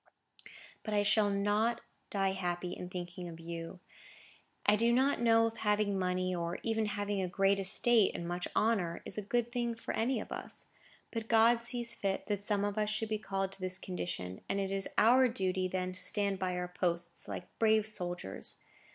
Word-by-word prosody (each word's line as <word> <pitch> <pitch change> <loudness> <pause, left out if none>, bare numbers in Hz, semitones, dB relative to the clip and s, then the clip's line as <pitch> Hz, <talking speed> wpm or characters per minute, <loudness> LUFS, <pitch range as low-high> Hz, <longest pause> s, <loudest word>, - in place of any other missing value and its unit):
"But 215 -2 -2
I 205 - +4
shall 210 0 +4
not 210 +4 +1 0.3
die 195 -1 +1
happy 180 -1 -2
in 180 - -6
thinking 175 -1 -6
of 165 -1 -9
you. 165 +2 -7 0.8
I 205 - +6
do 230 +2 +3
not 260 +2 +3
know 225 -1 +5
if 230 0 -3
having 210 -2 +1
money, 185 0 0
or 170 0 -2
even 225 -1 +1
having 205 -1 -1
a 185 - 0
great 195 +2 +2
estate 215 +3 +3
and 170 - -4
much 175 +1 -2
honour, 195 -7 +1
is 195 - -3
a - - -2
good 240 +3 0
thing 240 -1 -1
for 225 - -5
any 245 +4 +1
of - - -7
us. - - -4 0.5
But 225 -1 -4
God 230 +1 +5
sees 235 0 -2
fit 195 -4 -2
that 205 -1 -2
some 205 -1 +1
of 205 +1 -1
us 210 0 +1
should 215 +1 -1
be 215 -1 -1
called 195 -1 -2
to 195 0 -4
this 185 0 0
condition, 170 - -4
and 200 - 0
it 195 -1 -1
is 195 0 0
our 255 +4 +6
duty 190 -5 0
then 185 0 -2
to 185 - -7
stand 200 +1 0
by 185 -2 -1
our 180 0 -2
posts, 175 -1 -2
like - - -4 0.2
brave 220 -1 +4
soldiers. 175 - -4
200 Hz, 195 wpm, -33 LUFS, 180-220 Hz, 0.8 s, I